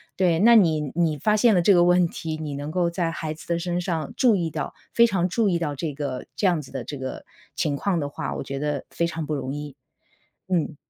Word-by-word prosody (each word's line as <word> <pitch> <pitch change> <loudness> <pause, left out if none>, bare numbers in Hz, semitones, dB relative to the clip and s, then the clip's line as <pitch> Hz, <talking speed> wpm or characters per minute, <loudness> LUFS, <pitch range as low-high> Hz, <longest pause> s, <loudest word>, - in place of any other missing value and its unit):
对， 175 -3 +2
那 235 +5 +7
你 165 -8 +5 0.2
你 165 -3 +1
发 210 +9 +2
现 220 +1 +4
了 180 - +4
这 200 +4 +5
个 175 -1 +5
问 180 0 +4
题。 160 -1 -5
你 150 -2 -5
能 145 +2 -5
够 175 0 +1
在 170 -1 -1
孩 155 -2 -4
子 160 - -13
的 170 0 0
身 175 0 -2
上 165 -5 -3
注 245 -5 +4
意 170 -3 -1
到， 155 -1 -4 0.2
非 235 - +6
常 190 -6 +1
注 215 +2 +2
意 175 -2 +1
到 150 -4 -2
这 150 +2 -3
个 140 -3 -4
这 200 - +2
样 175 -4 +2
子 135 - -13
的 - - -4
这 145 - -6
个 130 0 -6 0.3
情 145 - 0
况 180 +4 0
的 145 - -2
话， - - -4
我 - - -4
觉 135 - -5
得 145 -1 -2
非 170 - -1
常 165 -1 -3
不 150 +1 -2
容 135 -1 -4
易。 145 -1 -6 0.7
嗯。 170 -4 0
165 Hz, 270 characters per minute, -24 LUFS, 150-180 Hz, 0.7 s, 那